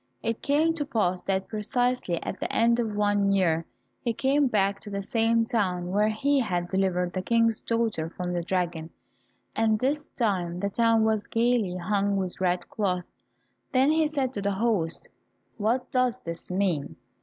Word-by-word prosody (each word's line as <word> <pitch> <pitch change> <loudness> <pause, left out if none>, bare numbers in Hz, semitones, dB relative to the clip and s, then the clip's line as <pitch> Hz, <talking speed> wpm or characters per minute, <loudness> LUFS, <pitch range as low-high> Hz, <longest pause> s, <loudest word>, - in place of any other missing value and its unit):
It 230 0 -2
came 310 +3 +2
to 315 -3 -2
pass 185 -8 0
that 190 0 0
precisely 220 -3 0
at - - -5
the - - -3
end 235 +1 +3
of 220 -3 -1
one 205 -1 +2
year 165 -4 +1 0.3
he 235 - -1
came 275 +4 +2
back 200 -3 +1
to 210 - -10
the 200 -1 -3
same 230 +2 +2
town 180 -6 -1
where 210 +2 +3
he 275 +6 +1
had 175 -7 -1
delivered 180 -2 0
the 185 - -2
King's 230 +2 +2
daughter 225 -9 -1
from 180 +1 -4
the 175 - -1
dragon, 170 -2 -2 0.7
and 220 -1 +2
this 285 +6 -1
time 180 -7 -1
the 200 +1 -2
town 230 0 +3
was 220 -1 0
gaily 230 -6 +1
hung 200 +2 0
with 185 -1 -2
red 180 -1 0
cloth. 180 -4 -1 0.7
Then 265 +3 +4
he 315 0 +3
said 275 -4 -1
to 200 - -3
the 200 0 0
host, 195 -6 -1 0.5
"What 235 +4 0
does 255 -1 +1
this 170 0 -7
mean? 180 -6 -1
210 Hz, 175 wpm, -27 LUFS, 185-235 Hz, 0.7 s, Then